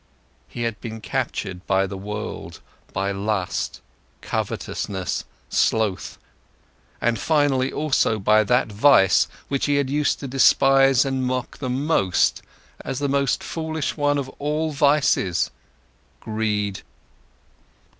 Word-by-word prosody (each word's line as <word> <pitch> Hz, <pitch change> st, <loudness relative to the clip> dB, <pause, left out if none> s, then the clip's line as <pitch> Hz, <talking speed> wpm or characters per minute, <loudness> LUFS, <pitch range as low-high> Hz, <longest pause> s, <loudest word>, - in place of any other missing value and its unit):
He 120 Hz, -, -5 dB
had 115 Hz, -3 st, -3 dB
been 110 Hz, -2 st, -6 dB
captured 95 Hz, -3 st, -4 dB
by 95 Hz, 0 st, +2 dB
the 95 Hz, -, -6 dB
world, 105 Hz, +3 st, -6 dB, 0.3 s
by 100 Hz, 0 st, -1 dB
lust, 100 Hz, -1 st, -2 dB, 0.4 s
covetousness, 95 Hz, -3 st, -3 dB, 0.2 s
sloth, 110 Hz, -4 st, 0 dB, 0.8 s
and 120 Hz, -2 st, 0 dB
finally 140 Hz, -1 st, +2 dB
also 145 Hz, -7 st, +1 dB
by 110 Hz, +2 st, +4 dB
that 125 Hz, -1 st, +2 dB
vice 105 Hz, -3 st, +5 dB, 0.2 s
which 140 Hz, 0 st, -1 dB
he 145 Hz, -, +2 dB
had 140 Hz, -2 st, 0 dB
used 150 Hz, 0 st, +1 dB
to 140 Hz, -, -4 dB
despise 135 Hz, 0 st, +4 dB
and 135 Hz, -1 st, -1 dB
mock 125 Hz, 0 st, -3 dB
the 130 Hz, -, -3 dB
most 125 Hz, -, +1 dB, 0.4 s
as 135 Hz, -, -4 dB
the 145 Hz, -, -1 dB
most 140 Hz, -2 st, +1 dB
foolish 160 Hz, -2 st, -3 dB
one 145 Hz, -1 st, +1 dB
of 140 Hz, -2 st, -2 dB
all 150 Hz, +2 st, -1 dB
vices: 140 Hz, -, +2 dB, 0.7 s
greed. 105 Hz, -3 st, -2 dB
125 Hz, 120 wpm, -23 LUFS, 105-140 Hz, 0.8 s, vice